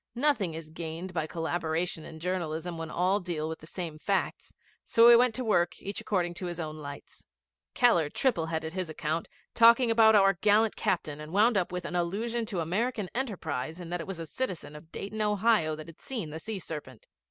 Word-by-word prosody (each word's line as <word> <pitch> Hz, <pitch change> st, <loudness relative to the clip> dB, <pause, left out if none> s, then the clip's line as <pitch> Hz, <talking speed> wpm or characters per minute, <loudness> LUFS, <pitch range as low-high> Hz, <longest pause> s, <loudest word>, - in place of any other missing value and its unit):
Nothing 235 Hz, -, +2 dB
is 160 Hz, -1 st, -8 dB
gained 165 Hz, +3 st, -6 dB
by 160 Hz, -2 st, -1 dB
collaboration 165 Hz, 0 st, -2 dB
in 160 Hz, -, -10 dB
journalism 170 Hz, -1 st, -3 dB
when 165 Hz, -1 st, -5 dB
all 185 Hz, +5 st, +1 dB
deal 170 Hz, -5 st, -3 dB
with 160 Hz, 0 st, -5 dB
the 155 Hz, -, -13 dB
same 165 Hz, -3 st, -6 dB
facts, 195 Hz, +3 st, -1 dB, 0.3 s
so 230 Hz, 0 st, +5 dB
we 240 Hz, -, +10 dB
went 240 Hz, -1 st, +4 dB
to 255 Hz, -, -2 dB
work 175 Hz, -6 st, +2 dB
each 200 Hz, -, -5 dB
according 175 Hz, -4 st, 0 dB
to 180 Hz, +1 st, -5 dB
his 175 Hz, 0 st, -5 dB
own 155 Hz, -1 st, -4 dB
lights. 140 Hz, -2 st, -10 dB, 0.5 s
Keller 175 Hz, -, +4 dB
triple 175 Hz, -, 0 dB
headed 160 Hz, 0 st, -3 dB
his 185 Hz, -3 st, -3 dB
account, 155 Hz, +1 st, -2 dB, 0.3 s
talked 235 Hz, +1 st, +7 dB
about 225 Hz, -3 st, +5 dB
our 195 Hz, -1 st, +6 dB
'gallant 210 Hz, +4 st, +3 dB
captain,' 150 Hz, -4 st, -1 dB
and 155 Hz, +1 st, -8 dB
wound 215 Hz, +5 st, +4 dB
up 185 Hz, -3 st, +1 dB
with 180 Hz, -1 st, -4 dB
an 175 Hz, -, -4 dB
allusion 220 Hz, +7 st, -1 dB
to 190 Hz, -6 st, -2 dB
American 205 Hz, +4 st, -1 dB
enterprise 160 Hz, -, -3 dB
in 175 Hz, -1 st, -8 dB
that 175 Hz, -1 st, -2 dB
it -, -, -8 dB
was 195 Hz, -2 st, -5 dB
a 165 Hz, -, -5 dB
citizen 180 Hz, -, -4 dB
of 160 Hz, +2 st, -13 dB
Dayton, 215 Hz, +2 st, -5 dB
Ohio, 210 Hz, -6 st, +2 dB
that 155 Hz, 0 st, -9 dB
had 165 Hz, -1 st, -14 dB
seen 220 Hz, -, -5 dB
the 160 Hz, -, -6 dB
sea 220 Hz, +3 st, -5 dB
serpent. 150 Hz, -, -8 dB
175 Hz, 205 wpm, -29 LUFS, 160-210 Hz, 0.5 s, we